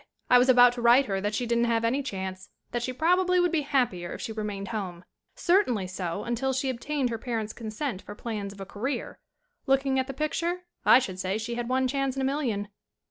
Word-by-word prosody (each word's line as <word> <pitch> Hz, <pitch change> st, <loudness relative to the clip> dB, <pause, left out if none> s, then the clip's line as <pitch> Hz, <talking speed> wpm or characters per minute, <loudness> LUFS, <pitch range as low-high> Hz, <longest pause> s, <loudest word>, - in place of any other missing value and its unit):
"I 250 Hz, -, +8 dB
was 250 Hz, +2 st, +3 dB
about 245 Hz, -1 st, +7 dB
to 245 Hz, -, -5 dB
write 240 Hz, +4 st, +6 dB
her 195 Hz, -3 st, -2 dB
that 205 Hz, +1 st, -1 dB
she 245 Hz, -, -1 dB
didn't 235 Hz, 0 st, +2 dB
have 230 Hz, -1 st, +1 dB
any 260 Hz, +5 st, +1 dB
chance; 190 Hz, -6 st, -5 dB, 0.2 s
that 240 Hz, -, -1 dB
she 255 Hz, -, -2 dB
probably 360 Hz, +6 st, +3 dB
would 355 Hz, -1 st, +3 dB
be 325 Hz, -3 st, +1 dB
happier 245 Hz, -12 st, 0 dB
if -, -, -7 dB
she -, -, -4 dB
re 215 Hz, -1 st, -4 dB
mained 200 Hz, -1 st, -4 dB
home; 185 Hz, -5 st, -5 dB, 0.3 s
certainly 340 Hz, -, +2 dB
so 185 Hz, 0 st, -4 dB
until 240 Hz, +3 st, -1 dB
she 260 Hz, 0 st, 0 dB
obtained 260 Hz, +1 st, -2 dB
her 230 Hz, -, -3 dB
parents' 225 Hz, -3 st, -3 dB
consent 220 Hz, -1 st, -4 dB
for 205 Hz, -, -9 dB
plans 210 Hz, -3 st, -4 dB
of 200 Hz, -, -13 dB
a 195 Hz, -, -5 dB
career. 240 Hz, +9 st, -4 dB, 0.5 s
Looking 270 Hz, 0 st, +2 dB
at 260 Hz, -, -1 dB
the 270 Hz, -, -5 dB
picture 335 Hz, +4 st, -1 dB, 0.3 s
I -, -, +9 dB
should 190 Hz, -8 st, -2 dB
say 190 Hz, +2 st, -1 dB
she 225 Hz, +2 st, -4 dB
had 240 Hz, 0 st, -3 dB
one 260 Hz, 0 st, +2 dB
chance 275 Hz, 0 st, -1 dB
in 270 Hz, -, -2 dB
a -, -, +2 dB
million." 245 Hz, -8 st, -1 dB
240 Hz, 230 wpm, -27 LUFS, 205-270 Hz, 0.5 s, I